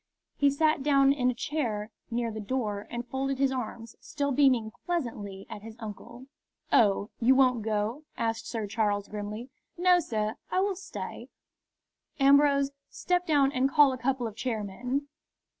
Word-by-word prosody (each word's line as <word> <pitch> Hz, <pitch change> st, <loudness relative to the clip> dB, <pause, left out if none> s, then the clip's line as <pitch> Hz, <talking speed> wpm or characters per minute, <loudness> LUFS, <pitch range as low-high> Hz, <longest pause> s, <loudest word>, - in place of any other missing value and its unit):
He 285 Hz, -, +4 dB
sat 310 Hz, +1 st, +2 dB
down 275 Hz, -1 st, +4 dB
in 250 Hz, -3 st, +1 dB
a 250 Hz, -, -1 dB
chair 230 Hz, -7 st, -2 dB, 0.2 s
near 235 Hz, -1 st, -1 dB
the 220 Hz, -, -6 dB
door 210 Hz, -2 st, -3 dB
and 240 Hz, 0 st, -4 dB
folded 270 Hz, +1 st, -2 dB
his 270 Hz, 0 st, +2 dB
arms, 230 Hz, -2 st, -5 dB
still 285 Hz, -2 st, -2 dB
beaming 255 Hz, -5 st, +3 dB
pleasantly 220 Hz, -, -3 dB
at 220 Hz, -3 st, -8 dB
his 220 Hz, +1 st, -10 dB
uncle. 235 Hz, +3 st, -9 dB, 0.5 s
"Oh, 205 Hz, -1 st, +3 dB
you 250 Hz, +3 st, +5 dB
won't 255 Hz, -3 st, +4 dB
go?" 220 Hz, +6 st, -2 dB
asked 225 Hz, 0 st, -2 dB
Sir 225 Hz, -3 st, -3 dB
Charles, 205 Hz, -1 st, 0 dB
grimly. 210 Hz, +4 st, -6 dB, 0.3 s
"No, 360 Hz, 0 st, +5 dB
sir; 215 Hz, -8 st, -2 dB
I 370 Hz, -, +1 dB
will 390 Hz, 0 st, +1 dB
stay." 385 Hz, +1 st, -7 dB, 0.9 s
"Ambrose, 280 Hz, 0 st, +5 dB, 0.2 s
step 360 Hz, 0 st, -1 dB
down 285 Hz, -3 st, +4 dB
and 265 Hz, -1 st, +1 dB
call 290 Hz, -1 st, +6 dB
a -, -, -4 dB
couple 255 Hz, 0 st, 0 dB
of 220 Hz, -2 st, -5 dB
chairmen." 245 Hz, +4 st, -3 dB
250 Hz, 160 wpm, -28 LUFS, 220-280 Hz, 0.9 s, call